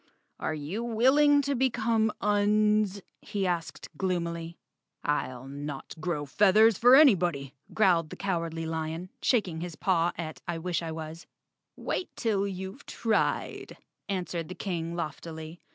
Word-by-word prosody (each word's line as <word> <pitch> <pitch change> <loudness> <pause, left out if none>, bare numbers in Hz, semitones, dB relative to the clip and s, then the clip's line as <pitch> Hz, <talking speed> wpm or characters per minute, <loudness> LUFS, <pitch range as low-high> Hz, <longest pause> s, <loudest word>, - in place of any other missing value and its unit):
"Are 155 - -2
you 155 +10 -4
willing 275 +5 +4
to 280 +1 0
become 230 -4 +1
Uns?" 210 -1 +2 0.2
he 205 -2 -2
asked 175 -2 -3
gloomily. 170 -2 -2 0.5
"I'll 130 -3 -2
not 140 0 -6
grow 155 -2 -2
feathers 210 +8 +5
for 245 +6 +7
anybody," 175 - +4 0.2
growled 175 -7 +3
the - - -7
Cowardly 165 -4 -2
Lion, 160 +2 -4
shaking 185 -10 +1
his 175 -2 -5
paw 175 -1 +1
at 160 -2 -6
I 170 -1 -2
wish 175 +1 -2
I 165 -1 -4
was. 160 +1 -7 0.5
"Wait 365 - -3
till 205 -4 0
you've 190 +6 -6
tried," 220 -2 -1 0.3
answered 180 -4 -3
the 185 - -6
King 170 -4 -3
loftily. 160 0 -6
180 Hz, 135 wpm, -28 LUFS, 165-215 Hz, 0.5 s, for